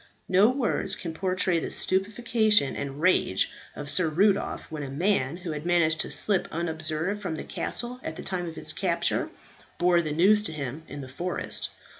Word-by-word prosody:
No 195 +4 +5
words 250 -6 0
can 170 -3 -6
portray 185 0 +1
the - - -4
stupefaction 210 - +2
and 140 0 -5
rage 160 - +2 0.2
of 145 - -6
Sir 160 +3 +2
Rudolph 195 +5 +1
when 155 -1 -4
a 140 - -5
man 160 -1 0
who 175 -2 -6
had 150 -1 -5
managed 170 -2 +2
to - - -2
slip 195 -2 +1
unobserved 160 +4 -2
from 180 -5 -3
the - - -5
castle 245 +1 -3
at 160 - -5
the - - -7
time 180 -2 -2
of 160 - -11
its - - -2
capture, - - 0 0.5
bore 175 -1 +4
the 155 -2 -3
news 195 +7 +4
to 200 -6 -4
him 140 0 -5
in 145 - -7
the 130 - -8
forest. 175 +8 -1
175 Hz, 185 wpm, -27 LUFS, 155-195 Hz, 0.5 s, No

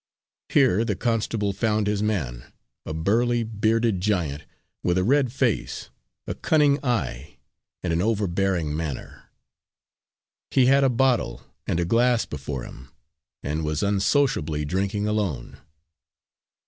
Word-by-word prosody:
Here 125 -7 +4
the 110 -4 -1
constable 110 -2 -1
found 105 +1 0
his 105 0 0
man 70 - -2 0.4
a - - -3
burly, 115 +8 +1
bearded 110 -2 +1
giant, 85 -8 -1 0.4
with 90 +1 +1
a 90 - +2
red 130 +3 +3
face, 125 -4 -1 0.3
a - - -3
cunning 145 -3 +2
eye 110 - -2 0.5
and 90 -2 0
an 85 - +1
overbearing 95 -6 0
manner. 75 -3 -6 1.2
He 130 - +4
had 135 +2 +5
a 135 - +4
bottle 125 - +1 0.2
and 85 - 0
a 85 - +1
glass 120 +5 +3
before 70 -3 -5
him, 65 +1 -11 0.5
and 75 +3 -2
was 75 +2 -1
unsociably 100 - +1
drinking 100 +5 -1
alone. 100 - -2
105 Hz, 125 wpm, -24 LUFS, 80-115 Hz, 1.2 s, had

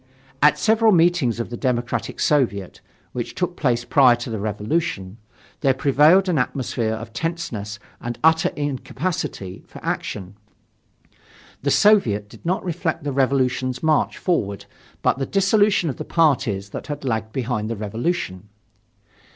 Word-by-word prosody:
At 150 +1 +5
several 225 0 +4
meetings 165 - +3
of 120 - -4
the 120 - -4
Democratic 120 -2 -2
Soviet 115 -11 0 0.3
which 120 -2 -5
took 180 -1 -2
place 120 -6 0
prior 130 -4 +5
to 120 0 -6
the 110 - -3
Revolution, 105 - -2 0.4
there 135 -3 +2
prevailed 150 +8 +4
an 170 -6 +2
atmosphere 125 -3 -1
of 110 0 -9
tenseness 120 -9 -4 0.2
and 120 0 -4
utter 160 +3 +4
incapacity 145 - -4
for - - -11
action. 100 0 -4 1.3
The - - 0
Soviet 120 - +4
did - - -15
not 185 +3 -1
reflect 165 -2 -2
the 145 - -2
Revolution's 130 -1 0
march 155 -1 +2
forward 100 - -1 0.4
but - - +2
the 135 - -2
dissolution 195 -1 +3
of 135 - -3
the - - -4
parties 120 - +1
that - - -7
had 145 -1 -5
lagged 110 -3 -2
behind 115 -3 -2
the 115 - -2
Revolution. 105 - -3
130 Hz, 145 wpm, -22 LUFS, 110-165 Hz, 1.3 s, At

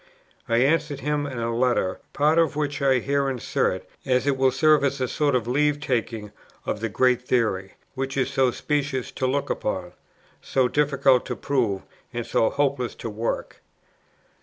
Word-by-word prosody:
I 115 - +3
answered 140 +2 +1
him 145 0 -1
in 130 -3 -6
a 115 0 -1
letter, 120 -6 +1
part 155 +3 +3
of 165 -2 +2
which 145 -1 -2
I 135 -1 +4
here 140 +2 0
insert, 130 -3 -1 0.2
as 130 0 +1
it 140 -1 +2
will 130 0 +3
serve 150 +3 +4
as 140 0 0
a 130 - 0
sort 145 +1 +1
of 120 -2 0
leave 145 +3 +2
taking 115 -6 -2 0.3
of - - -2
the 115 +1 -2
great 125 +4 +2
theory, 110 -7 0 0.2
which 135 0 -3
is 135 0 +1
so 135 -1 +3
specious 140 -1 -2
to 130 - -1
look 140 +2 -1
upon, 95 -4 -3 0.5
so 130 -2 +1
difficult 140 -2 +3
to - - -3
prove, 115 -9 -1 0.3
and 120 -1 -4
so 110 - +2
hopeless 140 -4 -1
to 115 - -6
work. 110 +2 -3
130 Hz, 175 wpm, -24 LUFS, 120-145 Hz, 0.5 s, I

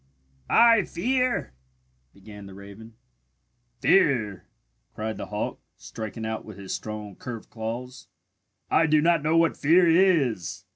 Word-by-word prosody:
"I 230 -2 +6
fear 250 - -1 0.3
" 65 0 -43
began 100 0 -12
the 95 - -12
raven. 100 +3 -12 0.9
"Fear?" 115 - +2 0.5
cried 110 0 -4
the - - -6
hawk, 105 0 -4 0.2
striking 110 0 -7
out 110 0 -4
with 110 -3 -11
his 95 -1 -6
strong 105 +1 -6
curved 120 -3 -8
claws. 120 +3 -6 0.6
"I 165 - +4
do 155 0 +4
not 165 0 +3
know 155 +3 +1
what 165 0 +3
fear 170 +4 +4
is! 165 - +2
115 Hz, 135 wpm, -25 LUFS, 105-165 Hz, 0.9 s, I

